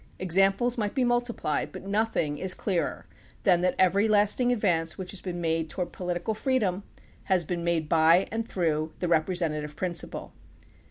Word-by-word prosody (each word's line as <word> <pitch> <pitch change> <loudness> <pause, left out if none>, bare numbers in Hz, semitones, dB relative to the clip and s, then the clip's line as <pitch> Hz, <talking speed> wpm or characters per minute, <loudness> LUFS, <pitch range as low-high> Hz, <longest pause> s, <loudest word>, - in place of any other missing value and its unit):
Examples 195 +7 +2
might 205 -2 -2
be 260 - +2
mul 240 0 +3
tiplied; 235 -11 -3
but - - -9
nothing 200 -8 0
is 185 +2 +1
clearer 185 -5 -2 0.4
than 180 -3 +4
that 180 0 +1
every 195 +3 +3
lasting 215 +4 +3
advance 170 -8 0
which 185 -1 -6
has 200 - -6
been 175 -2 -5
made 165 -1 -1
toward 180 +2 -3
political 180 +3 -3
freedom 215 -5 0 0.4
has 185 -3 +2
been 170 +1 -3
made 170 -2 0
by 165 +3 +4
and 225 +1 -2
through 155 -3 -1
the 180 - -2
representative 155 -3 0
prin 180 -2 -2
ciple. 170 - -4
180 Hz, 170 wpm, -27 LUFS, 165-205 Hz, 0.4 s, than